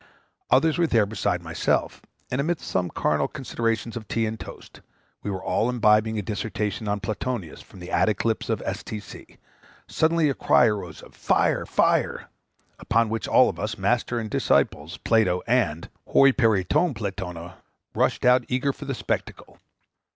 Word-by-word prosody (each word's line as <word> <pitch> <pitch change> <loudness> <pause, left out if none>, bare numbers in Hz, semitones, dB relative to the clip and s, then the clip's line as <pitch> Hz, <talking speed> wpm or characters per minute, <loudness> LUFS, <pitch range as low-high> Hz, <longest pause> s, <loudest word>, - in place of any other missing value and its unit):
Others 160 +1 +3
were 170 - +3
there 115 -7 +3
besides 90 -4 -2
myself; 85 0 -1 0.3
and 125 +2 0
amidst 170 +3 -2
some 90 -1 -1
carnal 75 -2 0
considerations 115 -3 -3
of 110 -3 -7
tea 115 +2 0
and 110 0 -4
toast, - - -11 0.4
we - - -4
were 95 -2 -4
all 115 - 0
imbibing 110 -2 +3
a 105 - -2
dissertation 105 +1 -3
on 105 0 -1
Plotinus 110 -4 -4
from 95 - -16
the 90 - -9
attic 110 0 +1
lips 115 -1 -1
of - - -1
S.T.C. 105 -1 -7 0.5
Suddenly 160 0 +2
a 140 - +1
cry 125 - +4
arose 100 -7 -3
of - - -15
"Fire - - +1
fire!" - - +1 0.5
upon 115 0 +1
which 115 +1 -3
all - - +5
of 85 - -4
us, 105 +2 -3
master 120 0 0
and 110 -2 -4
disciples, 80 +7 +1
Plato 105 -6 +1
and 110 -10 0 0.2
[Greek: - - -17
hoi 135 0 +7
peri 110 -7 +2
ton 130 - +1
Platona], 95 -4 -6 0.4
rushed - - 0
out, 125 0 +5
eager 130 +2 0
for - - -10
the - - -3
spectacle. - - -5
110 Hz, 165 wpm, -24 LUFS, 95-120 Hz, 0.5 s, hoi